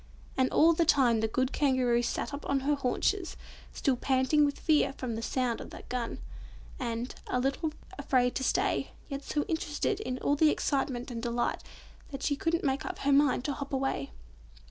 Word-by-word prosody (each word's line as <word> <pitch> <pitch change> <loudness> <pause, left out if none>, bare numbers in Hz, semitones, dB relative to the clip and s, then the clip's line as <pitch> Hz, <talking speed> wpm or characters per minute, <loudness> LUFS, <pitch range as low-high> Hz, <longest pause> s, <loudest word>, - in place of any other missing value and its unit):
And 260 -1 +2
all 330 +2 +5
the 335 - +2
time 255 -7 +4
the 220 - +1
good 255 +4 0
Kangaroo 255 -4 +2
sat 240 +4 -2
up 285 - -5
on 275 -1 +2
her 290 +2 +1
haunches, 290 +7 0 0.3
still 270 -3 +1
panting 265 +4 +3
with 285 - -2
fear 305 -4 +3
from 255 -3 -4
the 225 - -3
sound 245 0 -1
of - - -8
the - - -10
gun, 245 -2 -3 0.6
and 235 -1 -3
a 250 - 0
little 275 +5 0 0.3
afraid 255 -3 +2
to 265 - -2
stay, - - 0 0.2
yet 275 -1 -4
so 295 +1 -1
interested 320 +5 -1
in 255 -12 -3
all 285 - +1
the 310 +1 +5
excitement 265 -4 -1
and 230 -1 -4
delight, 240 0 -1 0.5
that 275 -1 -6
she 285 - +1
couldn't 330 +3 0
make 270 0 0
up 370 - -5
her 280 0 +1
mind 275 -3 +3
to 285 - 0
hop 280 0 -6
away. 265 - -1
270 Hz, 190 wpm, -30 LUFS, 250-295 Hz, 0.6 s, all